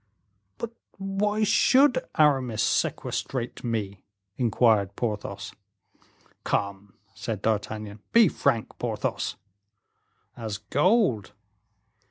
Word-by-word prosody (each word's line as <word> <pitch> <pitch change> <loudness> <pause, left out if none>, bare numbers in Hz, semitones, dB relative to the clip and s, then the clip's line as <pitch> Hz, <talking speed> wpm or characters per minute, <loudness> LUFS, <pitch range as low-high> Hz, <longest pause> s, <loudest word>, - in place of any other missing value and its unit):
"But 235 - -5 0.3
why 200 +2 0
should 280 - +4
Aramis 130 -7 +3
sequestrate 120 +3 -1
me?" 105 -5 -3 0.3
inquired 110 -5 +2
Porthos. 105 -3 -4 0.9
"Come," 100 0 -2 0.2
said 110 -4 -5
D'Artagnan, 105 -1 -2
"be 230 -3 +7
frank, 115 -7 -1
Porthos." - - -2 1.0
"As 110 -3 -4
gold." 145 - +2
115 Hz, 80 wpm, -26 LUFS, -, 1.0 s, be